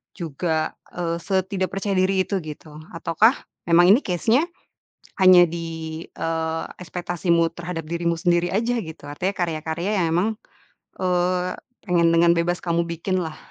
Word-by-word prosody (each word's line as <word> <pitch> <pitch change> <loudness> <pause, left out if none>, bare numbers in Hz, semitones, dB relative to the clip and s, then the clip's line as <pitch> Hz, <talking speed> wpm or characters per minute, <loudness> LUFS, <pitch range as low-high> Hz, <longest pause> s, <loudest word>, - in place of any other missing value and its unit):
juga, 160 -1 -2 0.2
eee, 170 -1 -2
setidak 190 -1 -1
percaya 195 0 -2
diri 185 0 +3
itu, 195 -2 -1
gitu? 155 0 -10 0.2
Ataukah 185 - +3 0.3
memang 175 +2 +6
ini 245 - +5
case-nya 225 - +1 0.8
hanya 185 -1 +8
di, 160 -1 -5
eee, 160 0 -2 0.2
ekspektasimu 170 -1 0
terhadap 170 -1 -5
dirimu 170 0 -1
sendiri 175 0 +2
aja, 230 +5 0
gitu? 160 -3 -10
Artinya 185 +7 -2
karya-karya 170 +3 -2
yang 165 - +2
memang, 185 +5 +2 0.7
eee, 180 0 +1 0.3
pengen 170 -3 +3
dengan 170 0 +5
bebas 175 +1 0
kamu 170 0 +1
bikinlah. 170 -1 -2
175 Hz, 135 wpm, -23 LUFS, 165-185 Hz, 0.8 s, hanya